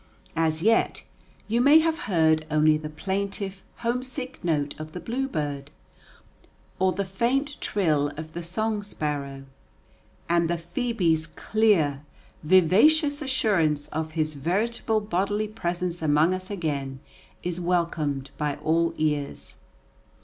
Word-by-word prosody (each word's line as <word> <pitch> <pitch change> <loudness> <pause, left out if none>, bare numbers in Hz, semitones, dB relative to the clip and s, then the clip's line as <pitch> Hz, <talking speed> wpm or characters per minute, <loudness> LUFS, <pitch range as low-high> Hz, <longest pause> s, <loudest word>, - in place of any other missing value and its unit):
As 160 0 +1
yet, 225 +2 +2 0.4
you 230 +3 +2
may 285 +4 +7
have 320 0 +2
heard 160 -3 +3
only 155 0 +4
the 155 0 -4
plaintive, 195 +3 -3 0.2
homesick 255 +1 -3
note 150 -4 0
of 155 0 -7
the 180 - -5
bluebird, 155 - -3 1.1
or 190 0 +3
the 200 +1 -2
faint 260 +9 0
trill 155 -8 +1
of 155 0 -7
the 170 - -4
song 210 +5 -1
sparrow; 145 -8 -4 0.8
and 170 -1 +2
the 175 - +1
phœbe's 170 -3 0
clear, 185 -11 +2 0.4
vivacious 255 - +4
assurance 190 - +1
of 155 0 -4
his 155 -1 0
veritable 215 - 0
bodily 205 +2 -1
presence 175 -4 -3
among 155 +3 +3
us 185 0 -4
again 145 -8 -3 0.4
is 180 0 -3
welcomed 160 -6 -1
by 150 -1 0
all 165 +1 +1
ears. 150 -2 -2
175 Hz, 120 wpm, -26 LUFS, 155-215 Hz, 1.1 s, may